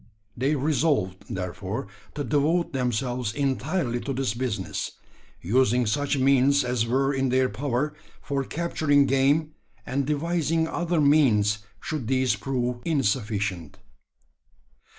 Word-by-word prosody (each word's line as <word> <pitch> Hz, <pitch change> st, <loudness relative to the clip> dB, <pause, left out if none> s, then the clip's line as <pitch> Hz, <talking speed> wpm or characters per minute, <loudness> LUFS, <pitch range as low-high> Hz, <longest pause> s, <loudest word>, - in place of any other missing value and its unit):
They 135 Hz, +5 st, +1 dB
resolved, 140 Hz, -, 0 dB
therefore, 95 Hz, +6 st, -4 dB, 0.3 s
to 145 Hz, -, -2 dB
devote 150 Hz, +7 st, +1 dB
themselves 125 Hz, -2 st, -1 dB
entirely 135 Hz, -, -1 dB
to 135 Hz, +4 st, -4 dB
this 130 Hz, -4 st, -1 dB
business 115 Hz, -6 st, -3 dB, 0.5 s
using 125 Hz, +4 st, +2 dB
such 140 Hz, +7 st, 0 dB
means 135 Hz, +1 st, +4 dB
as 125 Hz, -2 st, 0 dB
were 135 Hz, +3 st, +1 dB
in 135 Hz, -1 st, 0 dB
their 130 Hz, 0 st, +2 dB
power 145 Hz, +2 st, -2 dB, 0.3 s
for 140 Hz, -1 st, -2 dB
capturing 145 Hz, -2 st, +1 dB
game, 140 Hz, +4 st, +2 dB, 0.3 s
and 135 Hz, +1 st, -1 dB
devising 160 Hz, +1 st, 0 dB
other 175 Hz, 0 st, -1 dB
means 120 Hz, -9 st, +4 dB, 0.2 s
should 145 Hz, -3 st, -4 dB
these 130 Hz, -1 st, +2 dB
prove 125 Hz, -2 st, -2 dB
insufficient. 105 Hz, -, -1 dB
135 Hz, 115 wpm, -25 LUFS, 120-145 Hz, 0.5 s, means